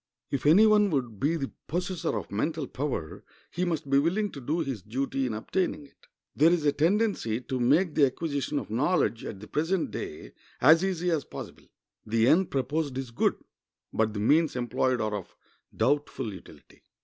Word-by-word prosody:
If 140 Hz, 0 st, -1 dB
any 185 Hz, +8 st, +7 dB
one 210 Hz, -1 st, +5 dB
would 125 Hz, -, -2 dB
be 155 Hz, +4 st, +1 dB
the 140 Hz, -5 st, -3 dB, 0.2 s
possessor 175 Hz, -, -2 dB
of 100 Hz, -, -6 dB
mental 150 Hz, +9 st, -1 dB
power 130 Hz, -, -4 dB, 0.3 s
he 180 Hz, +1 st, -1 dB
must 160 Hz, -4 st, -2 dB
be 140 Hz, 0 st, +4 dB
willing 190 Hz, +7 st, 0 dB
to 140 Hz, -, -9 dB
do 155 Hz, +7 st, -1 dB
his 130 Hz, -7 st, -3 dB
duty 135 Hz, +5 st, -2 dB
in 110 Hz, -, -3 dB
obtaining 150 Hz, +6 st, -2 dB
it. 140 Hz, -, -24 dB, 0.3 s
There 155 Hz, +4 st, +5 dB
is 170 Hz, -4 st, +1 dB
a 145 Hz, -, +5 dB
tendency 165 Hz, -, +1 dB
to 130 Hz, 0 st, -4 dB
make 150 Hz, +8 st, +3 dB
the 145 Hz, -3 st, +5 dB
acquisition 145 Hz, +1 st, -3 dB
of 140 Hz, -, -4 dB
knowledge, 125 Hz, -, +1 dB
at 100 Hz, -, -6 dB
the 105 Hz, -, -10 dB
present 165 Hz, +4 st, -1 dB
day, 75 Hz, -, -6 dB, 0.3 s
as 160 Hz, +6 st, +6 dB
easy 180 Hz, -2 st, 0 dB
as 155 Hz, -4 st, 0 dB
possible. -, -, -10 dB, 0.4 s
The 115 Hz, +1 st, +2 dB
end 180 Hz, +6 st, +4 dB
proposed 140 Hz, +1 st, -1 dB
is 130 Hz, -3 st, -5 dB
good, 115 Hz, -, +1 dB, 0.6 s
but 110 Hz, -1 st, 0 dB
the -, -, -2 dB
means 150 Hz, +8 st, +3 dB
employed 125 Hz, +1 st, 0 dB
are 110 Hz, -1 st, -1 dB
of 100 Hz, -4 st, -6 dB, 0.4 s
doubtful 145 Hz, -6 st, 0 dB
utility. 95 Hz, -, -15 dB
140 Hz, 185 wpm, -28 LUFS, 120-165 Hz, 0.6 s, any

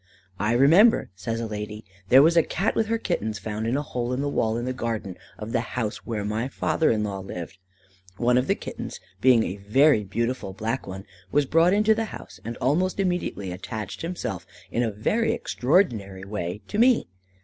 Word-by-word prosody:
"I 105 Hz, +3 st, +1 dB
remember," 165 Hz, -, +5 dB
says 115 Hz, +4 st, -4 dB
a 115 Hz, -, -2 dB
lady, 105 Hz, 0 st, -6 dB, 0.2 s
"there 135 Hz, +2 st, +8 dB
was 165 Hz, +2 st, +4 dB
a 165 Hz, -, +7 dB
Cat 195 Hz, +6 st, -1 dB
with 220 Hz, -, +1 dB
her 230 Hz, +1 st, +1 dB
Kittens 110 Hz, -, -2 dB
found 110 Hz, +2 st, -4 dB
in 125 Hz, +4 st, +1 dB
a 145 Hz, -, -1 dB
hole 125 Hz, -3 st, -3 dB
in 130 Hz, -, -1 dB
the 145 Hz, -, -1 dB
wall, 110 Hz, -4 st, 0 dB
in 120 Hz, -, -3 dB
the 130 Hz, -, -2 dB
garden 115 Hz, -6 st, -3 dB, 0.2 s
of 105 Hz, +1 st, -6 dB
the 120 Hz, -, +1 dB, 0.2 s
house 110 Hz, -4 st, -1 dB
where 110 Hz, -3 st, -2 dB
my 110 Hz, +4 st, -1 dB
father 155 Hz, +3 st, +1 dB
in 110 Hz, -1 st, +1 dB
law 100 Hz, -2 st, -3 dB
lived. 95 Hz, -1 st, -7 dB, 0.6 s
One 120 Hz, +2 st, +3 dB
of 125 Hz, +1 st, +2 dB
the -, -, +2 dB
kittens, -, -, -7 dB, 0.2 s
being 125 Hz, -2 st, +6 dB
a 95 Hz, -, -4 dB
very 110 Hz, +5 st, +4 dB
beautiful 115 Hz, +1 st, -2 dB
black 115 Hz, +5 st, -3 dB
one, 95 Hz, +1 st, -7 dB, 0.3 s
was 145 Hz, 0 st, +3 dB
brought 165 Hz, +5 st, +4 dB
into 210 Hz, +2 st, +4 dB
the 225 Hz, +1 st, -1 dB
house, -, -, -10 dB
and 115 Hz, +1 st, -5 dB
almost 175 Hz, +10 st, +1 dB
immediately 180 Hz, -, -1 dB
attached 100 Hz, +2 st, -6 dB
himself 95 Hz, -, -4 dB, 0.2 s
in 120 Hz, -, 0 dB
a 120 Hz, -, +1 dB
very 210 Hz, -, 0 dB
extraordinary 120 Hz, -, 0 dB
way 100 Hz, -1 st, -4 dB
to 210 Hz, -, -2 dB
me. 245 Hz, 0 st, +5 dB
115 Hz, 200 wpm, -25 LUFS, 105-155 Hz, 0.6 s, there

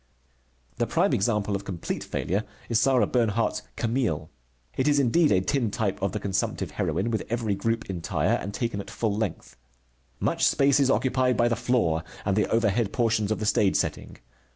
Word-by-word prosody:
The -, -, 0 dB
prime -, -, +2 dB
example 105 Hz, -1 st, +1 dB
of 100 Hz, -, -4 dB
complete 95 Hz, -4 st, -4 dB
failure 100 Hz, +4 st, -2 dB, 0.3 s
is 115 Hz, -2 st, +3 dB
Sarah 130 Hz, -4 st, +3 dB
Bernhardt's 115 Hz, -2 st, 0 dB
Camille. 110 Hz, -, -1 dB, 0.4 s
It 130 Hz, -, 0 dB
is 145 Hz, -1 st, +4 dB
indeed 145 Hz, +5 st, +3 dB
a 95 Hz, -, +4 dB
tintype 110 Hz, -4 st, -1 dB
of 100 Hz, -1 st, 0 dB
the 105 Hz, -, -3 dB
consumptive 95 Hz, -1 st, -2 dB
heroine, 115 Hz, -, -1 dB
with 110 Hz, -, 0 dB
every 115 Hz, -3 st, -1 dB
group 115 Hz, +2 st, -2 dB
entire, 90 Hz, -4 st, -1 dB
and 100 Hz, -, -2 dB
taken 115 Hz, -2 st, -2 dB
at 100 Hz, -, -11 dB
full 110 Hz, -1 st, -1 dB
length. 105 Hz, -5 st, -4 dB, 0.6 s
Much -, -, 0 dB
space 140 Hz, 0 st, +3 dB
is 135 Hz, -2 st, +3 dB
occupied 130 Hz, -1 st, +2 dB
by 120 Hz, -, +3 dB
the 120 Hz, -, +1 dB
floor 95 Hz, -10 st, +1 dB, 0.2 s
and 95 Hz, -1 st, +1 dB
the 105 Hz, -, +1 dB
overhead 115 Hz, -1 st, +1 dB
portions 110 Hz, -3 st, +1 dB
of 110 Hz, -, +1 dB
the 110 Hz, -, -3 dB
stage 105 Hz, -2 st, +2 dB
setting. -, -, -2 dB
110 Hz, 175 wpm, -26 LUFS, 100-120 Hz, 0.6 s, is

